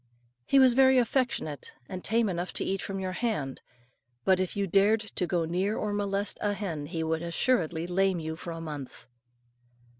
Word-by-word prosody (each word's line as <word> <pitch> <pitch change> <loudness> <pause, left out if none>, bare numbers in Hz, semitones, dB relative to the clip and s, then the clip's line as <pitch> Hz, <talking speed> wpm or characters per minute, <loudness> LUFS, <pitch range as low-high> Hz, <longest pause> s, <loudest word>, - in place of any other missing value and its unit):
He 275 - +4
was 260 -2 +7
very 265 +1 +6
affectionate, 235 - 0
and 185 -1 -6
tame 225 +2 +2
enough 180 -1 -3
to - - 0
eat 195 -1 -1
from 195 -1 -4
your 185 -1 -2
hand; 185 - -2 0.6
but 190 -1 +4
if 185 +1 -2
you 200 - +1
dared 200 +4 +3
to 205 -4 -3
go 170 0 0
near 185 +6 0
or 210 -1 -2
molest 200 0 -1
a 205 -1 +1
hen, 165 -8 -4
he 165 +1 -3
would 160 0 -1
assuredly 170 -2 0
lame 185 0 +1
you 160 0 -4
for 170 - -8
a 165 -1 -5
month. 145 -7 -7
185 Hz, 185 wpm, -28 LUFS, 165-210 Hz, 0.6 s, was